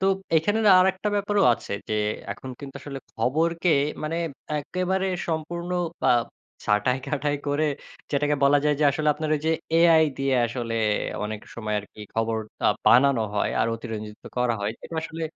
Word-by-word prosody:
তো - - 0 0.3
এখানে 205 +8 +2
না - - +8
আরেকটা 190 +2 +1
ব্যাপারও 205 0 +1
আছে - - -9 0.2
যে, 110 - 0 0.4
এখন 130 - -9
কিন্তু 140 -1 -9
আসলে 140 -1 -7
খবরকে 165 +9 +1 0.3
মানে 155 +2 -2 0.4
একেবারে 185 +5 -1 0.2
সম্পূর্ণ 170 +2 -3 0.4
আ - - +5 0.6
ছাঁটাই 105 +5 +2
কাটাই 145 0 -1
করে 145 +2 +1 0.5
যেটাকে 145 +1 +1
বলা 145 +1 +5
যায় 150 0 +3
যে, - - +4
আসলে 150 +2 0
আপনার 155 +1 -3
ওই 145 - -6
যে, - - +3 0.3
এ-আই 165 -1 +6
দিয়ে 135 -1 +1
আসলে 115 -1 -4 0.5
অনেক 105 0 -4
সময় 110 -2 -3
আরকি 105 +1 -11
খবর 115 0 0 0.3
আ - - +6 0.2
বানানো 130 -1 +5
হয় 105 - +1
আর - - +2
অতিরঞ্জিত 110 -2 -7
করা 125 -1 +2
হয়। 100 +1 -1
এটা - - -8
আসলে 165 +1 -6
145 Hz, 165 wpm, -25 LUFS, 115-165 Hz, 0.6 s, না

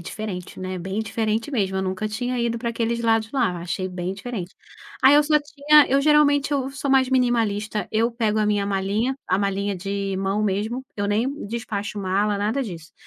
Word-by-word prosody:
diferente, 185 0 -6
né. 185 0 -4
Bem 190 +4 -3
diferente 220 +2 -1
mesmo, 195 -8 0
eu 190 - 0
nunca 190 +3 -2
tinha 245 +3 -2
ido 235 -1 0
pra 235 0 -2
aqueles 235 0 -1
lados 225 -1 +2
lá, 225 -10 0
achei 175 +2 -3
bem 185 0 -4
diferente. 195 -3 -6 0.5
Aí 270 +2 +8
eu 295 - +6
só 300 +1 0
tinha 295 0 +4
eu 275 +2 +3
geralmente, 290 -1 +4
eu 270 -1 0
sou 275 0 -3
mais 265 -1 +4
minimalista, 220 -5 +1
eu 225 +2 +2
pego 220 -2 0
a 215 - +2
minha 205 -1 +1
malinha, 200 +6 0
a 185 - +2
malinha 200 0 -1
de 195 +1 -3
mão 195 +2 0
mesmo, 215 +6 -1
eu 200 0 -1
nem 235 +6 -1
despacho 210 -2 -4
mala, 200 +2 0
nada 220 +7 0
disso. 170 -7 -8
215 Hz, 195 wpm, -23 LUFS, 195-245 Hz, 0.5 s, Aí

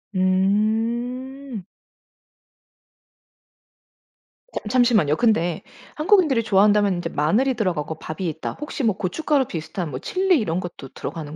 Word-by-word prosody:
음. 225 +6 0 3.0
잠 - - -8
잠시만요. 220 - +3
근데 175 -6 +1 0.3
한국인들이 305 - +3
좋아한다면 205 -1 +4
인제 170 -1 -3
마늘이 215 - +1
들어가고 170 -8 -2
밥이 170 +3 -5
있다. 160 +1 -5
혹시 295 -1 -4
뭐 215 -5 +1
고춧가루 275 - 0
비슷한 165 0 -5
뭐 130 - -4
칠리 375 -3 +2
이런 175 -5 -1
것도 175 -7 -8
들어가는 155 -2 -6
210 Hz, 275 characters per minute, -22 LUFS, 175-255 Hz, 3.0 s, 좋아한다면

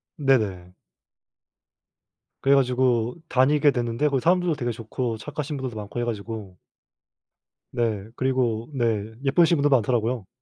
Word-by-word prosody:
네네. 105 - 0 1.7
그래 140 +1 +4
가지고 125 -3 +2
다니게 145 +3 +4
됐는데 120 +2 0
거기 135 -2 0
사람들도 175 0 +2
되게 120 -3 -2
좋고 115 +1 -4
착하신 150 +4 -5
분들도 130 -3 -5
많고 105 +2 -6
해 - - 0
가지고 105 -4 -6 1.1
네. 110 -4 -1
그리고 125 -3 0
네 110 -4 -1
예쁘신 170 +4 +4
분도 145 0 +2
많더라고요. 120 -4 +1
120 Hz, 290 characters per minute, -24 LUFS, 110-135 Hz, 1.7 s, 그래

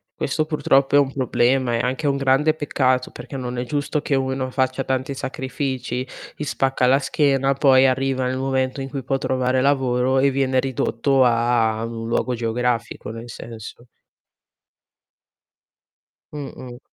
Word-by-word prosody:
Questo 155 +3 -1
purtroppo 140 -3 +2
è - - +8
un 135 -1 +1
problema, 130 -1 +1
è 115 - +1
anche 130 +5 -2
un 140 - +2
grande 140 +3 +3
peccato 130 -4 0
perché 140 - -10
non 125 -1 -4
è 125 - -2
giusto 145 +3 -1
che 145 - -2
uno 130 -1 -1
faccia 130 0 0
tanti 130 +1 -2
sacrifici, 130 -1 -4 0.3
gli 150 - -5
spacca 135 -2 0
la 135 +2 +4
schiena, 135 -1 +1
poi 135 -1 +5
arriva 130 0 0
nel 130 +1 -2
momento 130 0 -1
in 135 - -5
cui 135 -1 -5
può 135 +1 0
trovare 130 -1 0
lavoro 130 -1 +2
e 140 +1 +4
viene 130 -1 +1
ridotto 130 +1 +1
a 115 -2 +2
ad 115 +1 -4
un 115 0 -6
luogo 125 +1 0
geografico, 115 -1 -2
nel 115 +1 -8
senso. 115 +1 -10 2.5
Mh-mh. 130 -4 -8
130 Hz, 150 wpm, -22 LUFS, 125-135 Hz, 2.5 s, è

